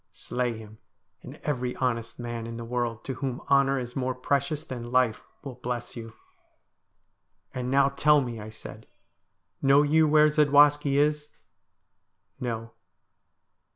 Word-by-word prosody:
Slay 125 -2 -3
him, 110 0 -13 0.4
and - - -10
every 125 -4 -2
honest 115 -3 -2
man 120 -1 -5
in 115 0 -7
the 115 - -6
world 120 -2 -3
to 135 - -3
whom 130 -1 -4
honour 140 0 +4
is 125 -1 -5
more 130 -1 -1
precious 140 +3 -1
than 120 -2 -7
life 125 -3 +2 0.2
will 135 -3 -6
bless 120 0 -5
you.' 115 -2 -8 0.7
' - - -45
And 125 0 -3
now 140 +1 +4
tell 150 +2 +4
me,' 120 -4 -4
I 105 +1 -8
said, 110 - -11 0.4
' - - -50
know 140 +1 +5
you 155 +2 +3
where 150 0 +5
Zadwaski 145 -1 +4
is? 150 0 +1 0.5
' - - -49
'No.' 115 -2 -4
125 Hz, 155 wpm, -27 LUFS, 120-140 Hz, 0.7 s, know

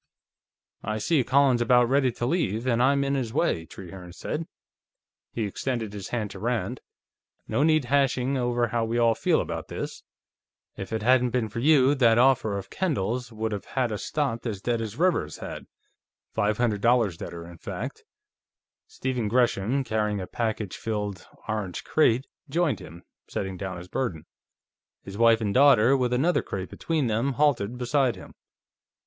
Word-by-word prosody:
"I 110 +1 -3
see 135 +6 +2
Colin's 130 -1 +3
about 120 0 +4
ready 135 0 +3
to 120 - -3
leave, 120 - 0
and 120 -2 +2
I'm 140 +2 +3
in 140 0 0
his 130 -5 -1
way," 85 - 0
Trehearne 90 -1 -10
said. 155 - -4 0.8
He 115 - -2
extended 110 +1 -3
his 100 -3 -6
hand 110 -4 -3
to - - -9
Rand. 120 0 -2 0.7
"No - - 0
need 155 -2 +3
hashing 135 0 +1
over 120 -2 0
how 115 0 0
we 115 +1 -1
all 115 -1 +4
feel - - +2
about - - -4
this. - - -6 0.7
If 95 - -7
it 110 -2 -2
hadn't 125 +1 +4
been 120 -2 -1
for 115 - -5
you, 140 0 +5
that 120 -5 +4
offer 120 -5 +3
of 95 0 -8
Kendall's 125 - -1
would 110 0 -3
have 105 -2 -4
had 125 -3 -1
us 105 - -4
stopped 130 -6 -2
as 105 -4 -3
dead 115 +2 -1
as 110 -1 -5
Rivers's 180 +1 +1
had. - - -7 0.7
Five 105 +1 +1
hundred 110 -4 0
dollars 115 -6 +3
deader, 85 0 -7
in 85 -1 -12
fact." - - -6 0.8
Stephen 125 -4 -2
Gresham, 120 +2 +1
carrying 105 -3 -1
a 95 - -4
package 110 -2 -3
filled 105 -3 -4 0.2
orange 105 -5 -3
crate, 130 -4 +2 0.2
joined 155 - +1
him, 85 +2 -12 0.2
setting 95 -1 -4
down 90 0 -5
his 90 +1 -9
burden. 90 -7 -3 0.8
His 95 - -9
wife 115 -1 +5
and 100 -2 -1
daughter, 135 -2 +6
with 125 -2 0
another 145 +9 +2
crate 95 -2 -5
between 160 -4 -1
them, 115 +4 0
halted 125 -5 +1
beside 125 0 +1
him. - - -12
120 Hz, 170 wpm, -26 LUFS, 105-130 Hz, 0.8 s, daughter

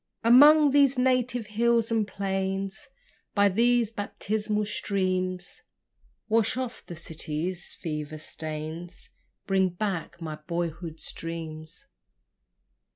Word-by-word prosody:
Among 290 +5 +8
these 280 -1 +4
native 250 -2 +1
hills 230 +2 +2
and 220 -2 +1
plains, 195 0 -3 0.5
By 205 -1 +5
these 235 +2 +3
baptismal 210 0 -2
streams, 185 -3 -2 0.7
Wash 225 +1 +2
off 255 -2 -4
the 175 - -7
city's 165 +2 -4
fever 150 -1 -5
stains, 155 +3 -6 0.3
Bring 190 -1 +2
back 180 -2 -3
my 155 -3 -5
boyhood's 170 -1 -3
dreams. 165 - -7
195 Hz, 95 wpm, -27 LUFS, 170-230 Hz, 0.7 s, Among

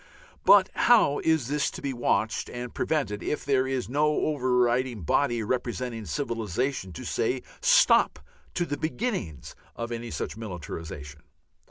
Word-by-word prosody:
But - - +7
how 220 -12 +4
is 160 -7 +1
this 145 +1 0
to - - -8
be 140 -1 -3
watched 120 -2 0
and 120 0 -6
prevented 125 -10 -1
if 150 - -3
there 130 -2 +2
is 130 -2 -2
no 145 +4 +2
overriding 125 -4 +1
body 120 - +1
representing 120 -1 -3
civilization 115 - -2
to - - -8
say - - -1 0.2
"Stop" - - +5 0.4
to 175 - +1
the 145 -3 -3
beginnings 155 - -3 0.2
of 115 0 -5
any 120 0 -4
such - - -4
militarization? 80 -7 -7
125 Hz, 140 wpm, -27 LUFS, 110-140 Hz, 0.4 s, But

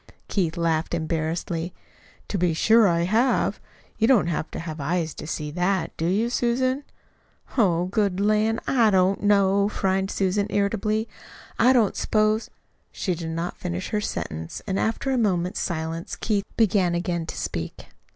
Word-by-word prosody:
Keith 170 -4 -1
laughed 165 0 0
embarrassedly. 165 +1 -2 0.5
"To 200 - -1
be 175 -2 +2
sure 225 +5 +5
I 170 -2 +2
have! 220 +9 +2 0.4
You 225 - +4
don't 245 -9 +5
have 160 -1 -2
to - - -7
have 160 -2 -6
eyes 165 +2 -1
to - - -8
see 150 -2 -4
that, 180 +1 0
do 165 - -1
you, 215 +6 +1
Susan?" 255 +3 +1 0.7
"Oh, 180 -7 +3
good 195 -1 0
lan', 215 +2 +2
I 235 -5 +4
don't 190 -1 +2
know," 200 0 +3
frowned 190 -1 0
Susan 200 +1 0
irritably. 215 +2 0 0.5
"I 245 +3 +6
didn't 235 -6 +3
s'pose 215 +1 +1 0.2
" - - -43
She 185 - -2
did 165 -1 -5
not 165 +2 -3
finish 180 +1 -4
her 210 - 0
sentence, 80 - -4
and 190 0 -1
after 230 +4 -1
a 260 - +1
moment's 185 -5 0
silence 165 0 -3
Keith 205 -3 -1
began 190 -5 +3
again 170 -1 -2
to - - -6
speak. 80 0 -4
190 Hz, 160 wpm, -24 LUFS, 170-215 Hz, 0.7 s, I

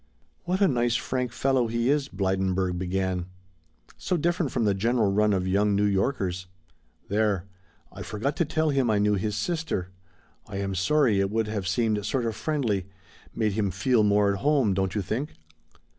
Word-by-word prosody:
"What 185 +3 -1
a 200 - +6
nice, 120 -4 +1
frank 125 0 -2
fellow 130 0 +1
he 115 +3 +1
is," 145 -1 0
Blydenburg 95 -1 0
began; 95 -1 -2 0.7
"so 180 - -1
different 170 -2 0
from 120 - 0
the 100 - +3
general 110 +1 +1
run 105 +1 +3
of 95 -2 0
young 100 +2 +2
New 100 +1 +2
Yorkers. 95 -3 -1 0.6
There, 100 -2 +1 0.5
I - - -9
forgot 125 +7 -3
to 170 - +2
tell 155 +1 0
him 135 -4 +1
I 105 - +3
knew 105 0 +2
his 105 +1 -1
sister; 160 - -2 0.6
I 100 - -6
am 100 0 -2
sorry, 105 - +2
it 100 0 +1
would 110 +1 0
have 100 -3 -3
seemed 110 0 0
sort 125 +3 -1
of 115 -2 -2
friendly, 110 - -1 0.5
made 110 -1 +1
him 100 -1 0
feel 110 +6 +2
more 105 -1 +3
at 100 - -4
home, 140 -6 +2
don't 95 0 -1
you 105 - 0
think? 125 - -3
105 Hz, 180 wpm, -26 LUFS, 95-130 Hz, 0.7 s, a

